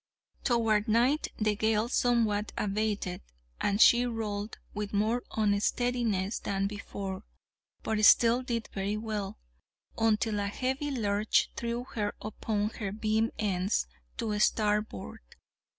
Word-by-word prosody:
Toward 225 -3 +2
night 245 +7 +3
the 215 -1 +1
gale 220 +1 +1
somewhat 230 -4 +1
abated, 205 -3 -1 0.4
and 200 0 0
she 240 +1 +7
rolled 215 -2 -4 0.2
with 210 0 -4
more 220 +4 +1 0.2
unsteadiness 215 0 +1
than 195 0 -1
before, 200 -1 -5 0.6
but 215 -1 -1
still 235 +3 +6
did 235 -3 -3
very 200 +2 -1
well, 215 -3 -4 0.6
until 220 -1 +2
a 200 - -1
heavy 260 +7 -2
lurch 215 -5 +1
threw 235 +1 -3
her 205 -2 -2
upon 210 0 -2
her 205 -3 -5
beam 220 +1 +1
ends 195 -1 0 0.3
to 210 -2 -1
starboard. 210 - 0
215 Hz, 120 wpm, -30 LUFS, 205-230 Hz, 0.6 s, she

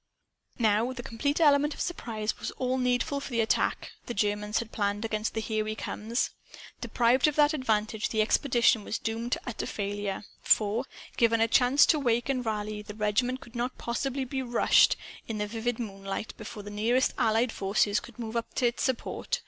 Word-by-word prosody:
Now, 225 +2 +2
the 245 -1 -7
complete 265 +5 -1
element 295 -1 +4
of - - -13
surprise 220 -10 -3
was - - -3
all 255 0 0
needful 250 +4 +1
for 280 - -7
the 235 -3 -1
attack 220 - 0 0.2
the 240 - -4
Germans 210 +1 0
had 230 -1 -3
planned 205 +1 -1
against 215 0 -2
the 220 - 0
"Here 215 0 -1
We 215 0 -3
Comes." 220 +3 -2 0.5
Deprived 245 +4 +3
of 300 - 0
that 295 0 +4
advantage 220 -5 0
the 220 - -1
expedition 240 -2 +3
was 220 - -3
doomed 230 +2 -3
to - - -2
utter 245 - -4
failure. 205 -1 -3 0.2
For, 220 +4 +2 0.3
given 230 -1 +3
a 225 - +4
chance 255 +4 +5
to 310 - +3
wake 240 -2 +1
and 255 -2 0
to 225 - -1
rally, 210 0 -3
the 210 0 -9
regiment 225 +5 0
could 235 - -14
not 245 +2 -2
possibly 265 +3 -2
be 265 +1 -3
"rushed," 245 -2 +4 0.3
in 225 - -3
vivid 225 +3 -2
moonlight, 195 -2 -5
before 215 -1 -8
the 205 - -8
nearest 230 +5 +1
Allied 225 +2 +2
forces 200 +1 +1
could 240 - -13
move 230 -1 -5
up 230 0 -3
to 250 - +1
its 240 0 0
support. 260 - -1
230 Hz, 190 wpm, -28 LUFS, 215-255 Hz, 0.5 s, chance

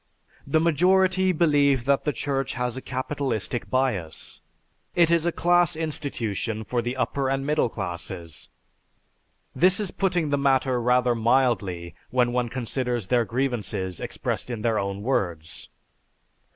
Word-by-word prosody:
The 155 +3 +3
majority 185 +3 +3
believe 145 -7 +3
that 140 0 +2
the 150 - +2
Church 135 -2 -2
has 125 -1 -2
a 130 - -5
capitalistic 130 -3 -3
bias. 115 - -2 0.5
It 170 -1 +4
is 170 0 +3
a - - +2
class 175 0 +3
institution 115 - -3
for 120 +2 -1
the 120 +2 -3
upper 130 +2 0
and 135 0 -1
middle 150 -4 +1
classes." 85 -4 -6 1.1
This 185 +4 +4
is 205 -4 -1
putting 180 -5 0
the 145 0 +1
matter 130 -2 +2
rather 125 0 +3
mildly 110 -8 +1 0.2
when 125 -1 +2
one 125 -1 0
considers 125 -2 -2
their 120 -2 +3
grievances 110 -7 -2
expressed - - -3
in 115 -3 -4
their 115 -2 +2
own 100 0 -3
words. 85 -10 -2
130 Hz, 140 wpm, -25 LUFS, 115-145 Hz, 1.1 s, It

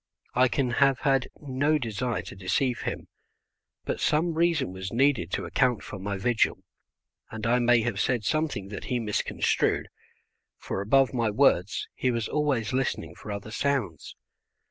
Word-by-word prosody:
I 130 +1 +4
can 130 -1 0
have 135 -2 +4
had 135 -3 +2
no 145 +2 +1
desire 120 -2 -2
to - - -9
deceive 100 +7 0
him, - - -4 0.8
but - - -2
some 165 +3 +1
reason 160 - +1
was 95 0 -6
needed 130 - +2
to - - -1
account 125 -4 +1
for 100 - -8
my 100 +1 -3
vigil, 115 +4 +1 0.7
and 110 -1 -6
I 120 +2 +3
may 120 -1 +4
have 110 -3 -2
said 120 -1 +1
something 145 -7 -1
that 100 - -7
he 125 - -1
misconstrued, 105 -3 0 0.7
for 95 - -4
above 135 +7 +3
my 115 -3 +1
words 105 -5 +2
he 130 - 0
was 115 -2 -1
always 135 -7 0
listening 125 -11 -1
for 105 - -9
other 100 +1 -6
sounds. 120 - -2
120 Hz, 160 wpm, -27 LUFS, 105-135 Hz, 0.8 s, I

